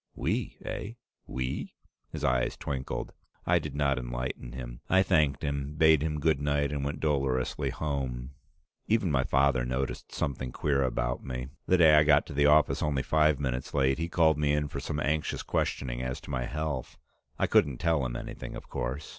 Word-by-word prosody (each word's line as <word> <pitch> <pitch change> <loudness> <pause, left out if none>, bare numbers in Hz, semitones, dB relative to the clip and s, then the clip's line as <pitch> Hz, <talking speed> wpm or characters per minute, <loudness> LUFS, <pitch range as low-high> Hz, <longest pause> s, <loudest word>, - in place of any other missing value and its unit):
"We, - - -2
eh? 105 - -4 0.3
We?" 65 +1 -4 0.3
His - - -6
eyes 65 0 +1
twinkled. 65 -2 -4 0.3
I - - +4
did - - -6
not 70 -2 +1
enlighten - - -5
him. 60 -1 -7
I 95 +1 +5
thanked 75 -5 +2
him, 70 0 -2
bade 80 -1 +5
him 75 -1 -1
good 75 -1 +2
night, 70 0 +1
and 70 -1 -2
went 70 +1 -3
dolorously 70 -4 0
home. 65 -4 -3 0.6
Even 105 -6 +2
my 65 -2 +2
father 65 -2 +2
noticed 65 +2 -3
something 65 -2 -3
queer 70 0 0
about 65 -1 -1
me. 65 -1 -5 0.2
The 95 - +4
day 80 -3 +7
I 75 0 +7
got 75 -1 +4
to 80 - -8
the 70 +1 +4
office 75 +1 +4
only 70 -3 0
five 75 -2 +3
minutes 65 -2 -3
late, 65 0 +2
he 85 +1 -2
called 80 -3 +3
me 75 -1 +2
in 75 0 0
for 70 - -5
some 75 +1 -3
anxious 75 +3 -1
questioning 60 -2 -1
as 65 +2 -3
to 80 - -9
my 60 -2 -1
health. 75 -3 -4 0.4
I - - +2
couldn't 70 -4 +3
tell 80 -2 +1
him - - -3
anything, - - -6
of - - -9
course. 65 +4 -3
70 Hz, 190 wpm, -29 LUFS, 65-75 Hz, 0.6 s, day